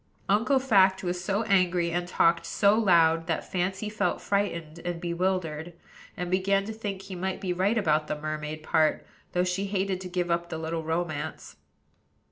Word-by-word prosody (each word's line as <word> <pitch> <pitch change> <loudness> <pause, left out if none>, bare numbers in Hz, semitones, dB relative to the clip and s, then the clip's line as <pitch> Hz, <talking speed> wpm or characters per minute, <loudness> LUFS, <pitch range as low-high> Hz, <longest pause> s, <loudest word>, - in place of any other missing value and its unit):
Uncle 230 +8 +3
Fact 195 -8 +4
was 180 0 -2
so 200 +3 0
angry 180 -5 +2
and 175 +1 -1
talked 170 -1 +3
so 200 -1 +3
loud, 165 -6 +4
that 165 - -2
Fancy 190 +3 -1
felt 215 0 -1
frightened 170 -6 -2
and 175 0 -4
bewildered; 170 -2 -2 0.4
and 180 0 -3
began 195 +1 +2
to 220 - -5
think 205 -3 -5
he 195 - -8
might 185 +1 -3
be 185 -2 -2
right 195 +6 +1
about 155 -6 +2
the 150 - -3
mermaid 155 0 -4
part, 155 0 +2 0.3
though 180 - +2
she 180 +2 -1
hated 195 -1 -1
to 185 - -6
give 175 -1 -1
up 170 0 0
the 160 - -4
little 160 +1 -3
romance. 160 -1 -4
180 Hz, 175 wpm, -27 LUFS, 165-195 Hz, 0.4 s, Fact